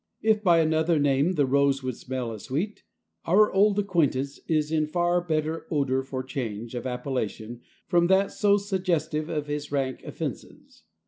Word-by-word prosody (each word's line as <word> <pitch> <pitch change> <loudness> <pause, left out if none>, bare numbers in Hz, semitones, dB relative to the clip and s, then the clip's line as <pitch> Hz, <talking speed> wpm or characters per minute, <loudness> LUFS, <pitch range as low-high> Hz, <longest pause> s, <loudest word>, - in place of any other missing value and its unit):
If 215 -1 +3
by 170 -3 +5
another 160 +1 +2
name 145 +4 +2
the 145 -5 +2
rose 140 0 +2
would 130 -2 -3
smell 125 -2 -4
as 110 -3 -8
sweet, 180 +11 -3 0.4
our 210 +5 +4
old 200 +1 +4
acquaintance 150 -9 0
is 155 -1 +1
in 155 -1 +1
far 175 +2 +1
better 160 -1 -2
odor 135 -4 +1
for 130 -1 -5
change 120 -4 -5
of 120 +1 -4
appellation 125 -2 -4 0.3
from 175 -1 +3
that 190 +1 +3
so 205 -1 +3
suggestive 175 -6 -1
of 150 -2 -2
his 145 0 -4
rank 135 -3 -1
offenses. 80 - -8
150 Hz, 165 wpm, -26 LUFS, 130-175 Hz, 0.4 s, by